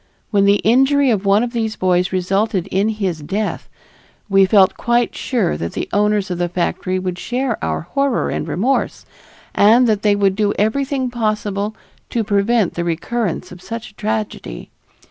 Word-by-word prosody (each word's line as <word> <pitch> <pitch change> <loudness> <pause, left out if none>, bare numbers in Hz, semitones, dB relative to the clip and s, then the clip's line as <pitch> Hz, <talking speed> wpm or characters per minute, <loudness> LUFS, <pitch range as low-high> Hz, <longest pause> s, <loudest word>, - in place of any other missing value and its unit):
When 200 -2 +3
the 200 0 +5
injury 270 +4 +4
of 205 -2 -1
one 200 +3 +4
of 245 0 -4
these 225 -2 -2
boys 180 -1 +1
resulted 190 +1 0
in 195 +3 +1
his 195 -7 -2
death, 200 +8 -3 0.6
we 195 -1 +5
felt 190 -1 +4
quite 240 -1 0
sure 225 -10 -1
that 85 - -4
the - - -3
owners 205 -2 +1
of 175 - -3
the 175 0 0
factory 180 +1 -1
would 185 -1 -4
share 250 -1 -2
our 80 -1 -1
horror 275 - -1
and - - -3
remorse, 250 +9 -1 0.5
and 230 +5 +5
that 215 -3 +1
they 210 -1 +3
would 195 -2 +2
do 205 0 0
everything 260 +4 0
possible 215 -2 -2 0.3
to 230 - -1
prevent 205 0 +1
the 170 - -3
recurrence 175 +4 -2
of 180 0 -11
such 230 +4 -7
a - - -34
tragedy. 215 - -4
210 Hz, 170 wpm, -18 LUFS, 185-230 Hz, 0.6 s, the